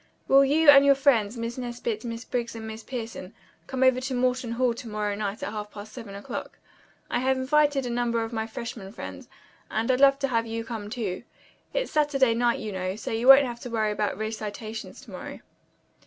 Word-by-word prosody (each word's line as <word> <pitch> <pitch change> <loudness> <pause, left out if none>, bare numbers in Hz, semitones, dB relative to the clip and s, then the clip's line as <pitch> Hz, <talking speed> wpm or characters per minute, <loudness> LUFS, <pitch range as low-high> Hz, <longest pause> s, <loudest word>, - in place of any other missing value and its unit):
"Will 275 +1 +7
you 300 +3 +2
and 275 -1 +8
your 280 0 +6
friends, 245 -6 +2
Miss 230 +2 -4
Nesbit, 240 -3 -4
Miss 230 -1 -5
Briggs 235 -2 -3
and 225 -1 -7
Miss 220 0 -7
Pierson, 225 -6 -6 0.3
come 260 0 -1
over 260 -1 +4
to 260 0 -3
Morton 250 -1 0
Hall 245 0 +2
to 235 +1 -9
night 210 -1 -3
at - - -3
half 210 -1 -5
past 210 +1 -10
seven 225 -6 -8
o'clock. 200 - -6 0.5
I - - +1
have 260 +1 +1
invited 285 0 +2
a - - -3
number 235 -1 0
of 225 +1 -6
my 220 -1 -2
freshmen 225 -4 -7
friends, - - -8 0.4
and 225 +3 0
I'd 255 - +1
love 275 0 +7
to 275 -1 -1
have 230 -2 0
you 225 0 -3
come, 220 -3 -6
too. 210 -6 -3 0.5
It's - - -2
Saturday 280 -5 +3
night 235 0 +2
you 215 - -5
know, 185 0 -3
so 220 - -6
you 225 +3 -1
won't 270 +1 +10
have 240 -2 -5
to 245 - -7
worry 220 -2 0
about 210 0 -1
recitations 220 0 -5
to - - -14
morrow." - - -8
235 Hz, 210 wpm, -26 LUFS, 220-260 Hz, 0.5 s, won't